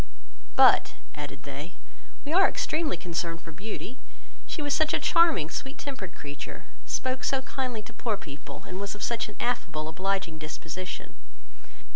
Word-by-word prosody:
But, -, -, +7 dB, 0.2 s
(added 145 Hz, -2 st, -6 dB
they,) 145 Hz, +6 st, -6 dB, 0.5 s
we 295 Hz, -, -1 dB
are 385 Hz, +2 st, +8 dB
extremely 310 Hz, -, +1 dB
concerned 170 Hz, -1 st, -2 dB
for 165 Hz, -, -9 dB
Beauty, 210 Hz, +8 st, -5 dB, 0.5 s
she 310 Hz, -, -2 dB
was 290 Hz, -1 st, +2 dB
such 315 Hz, +1 st, +4 dB
a -, -, +3 dB
charming, 330 Hz, -, +5 dB
sweet 270 Hz, +2 st, -4 dB
tempered 260 Hz, -11 st, -5 dB
creature, 145 Hz, 0 st, -7 dB, 0.2 s
spoke 255 Hz, 0 st, 0 dB
so 265 Hz, -1 st, +2 dB
kindly 255 Hz, -5 st, -2 dB
to -, -, -11 dB
poor 220 Hz, -4 st, 0 dB
people, 140 Hz, -5 st, -8 dB
and 185 Hz, +1 st, -4 dB
was 200 Hz, +1 st, -2 dB
of 205 Hz, -, -5 dB
such 230 Hz, -2 st, 0 dB
an 210 Hz, -, -9 dB
affable, 165 Hz, -11 st, 0 dB
obliging 185 Hz, -1 st, 0 dB
disposition." 165 Hz, +4 st, -5 dB
195 Hz, 155 wpm, -29 LUFS, 160-260 Hz, 0.5 s, are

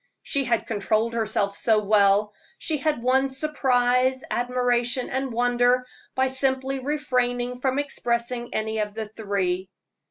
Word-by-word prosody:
She 275 Hz, -1 st, -1 dB
had 235 Hz, -2 st, 0 dB
controlled 220 Hz, +2 st, 0 dB
herself 210 Hz, -3 st, -1 dB
so 215 Hz, -1 st, +2 dB
well; 205 Hz, 0 st, +3 dB, 0.2 s
she 315 Hz, -, -2 dB
had 295 Hz, -4 st, -1 dB
won 265 Hz, +2 st, +3 dB
surprise, 260 Hz, -2 st, +2 dB
admiration, 245 Hz, 0 st, 0 dB
and 265 Hz, 0 st, -2 dB
wonder 245 Hz, +1 st, +2 dB, 0.3 s
by 260 Hz, 0 st, +2 dB
simply 265 Hz, 0 st, 0 dB
refraining 250 Hz, -3 st, -1 dB
from 265 Hz, 0 st, 0 dB
expressing 240 Hz, -3 st, -1 dB
any 220 Hz, 0 st, -2 dB
of 210 Hz, -1 st, -3 dB
the 220 Hz, -1 st, -4 dB
three. 195 Hz, -4 st, -2 dB
245 Hz, 130 wpm, -24 LUFS, 220-260 Hz, 0.3 s, well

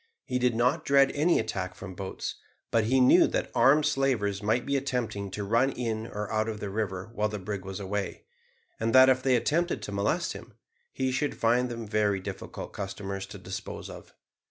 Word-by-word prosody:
He 125 Hz, -2 st, -1 dB
did 125 Hz, -2 st, +2 dB
not 120 Hz, +2 st, +2 dB
dread 140 Hz, -1 st, +4 dB
any 160 Hz, +4 st, +3 dB
attack 95 Hz, -1 st, -3 dB
from 95 Hz, -1 st, -8 dB
boats, 95 Hz, +1 st, -5 dB, 0.3 s
but 115 Hz, -2 st, +3 dB
he 130 Hz, +4 st, +3 dB
knew 125 Hz, -, +6 dB
that -, -, -2 dB
armed 140 Hz, +5 st, +5 dB
slavers 125 Hz, -9 st, +1 dB
might 110 Hz, +4 st, +1 dB
be 140 Hz, -, 0 dB
attempting 125 Hz, -7 st, -2 dB
to 100 Hz, +2 st, -4 dB
run 115 Hz, +7 st, +2 dB
in 115 Hz, -2 st, -3 dB
or 105 Hz, -1 st, -4 dB
out 110 Hz, +1 st, +1 dB
of 110 Hz, -1 st, -5 dB
the 100 Hz, -2 st, -4 dB
river 100 Hz, -1 st, -3 dB
while 105 Hz, 0 st, 0 dB
the 105 Hz, -, -4 dB
brig 100 Hz, 0 st, -5 dB
was 95 Hz, 0 st, -6 dB
away, 100 Hz, 0 st, -3 dB, 0.6 s
and 115 Hz, +2 st, 0 dB
that 130 Hz, 0 st, +9 dB
if 130 Hz, 0 st, +3 dB
they 130 Hz, -1 st, +3 dB
attempted 170 Hz, +8 st, 0 dB
to -, -, -5 dB
molest 100 Hz, 0 st, 0 dB
him, -, -, -11 dB, 0.4 s
he 130 Hz, -1 st, -1 dB
should 135 Hz, +3 st, -1 dB
find 120 Hz, +2 st, +2 dB
them 115 Hz, -1 st, -5 dB
very 105 Hz, -2 st, +1 dB
difficult 95 Hz, -, -7 dB
customers 95 Hz, 0 st, -5 dB
to -, -, -9 dB
dispose -, -, -7 dB
of. -, -, -12 dB
110 Hz, 200 wpm, -28 LUFS, 100-130 Hz, 0.6 s, that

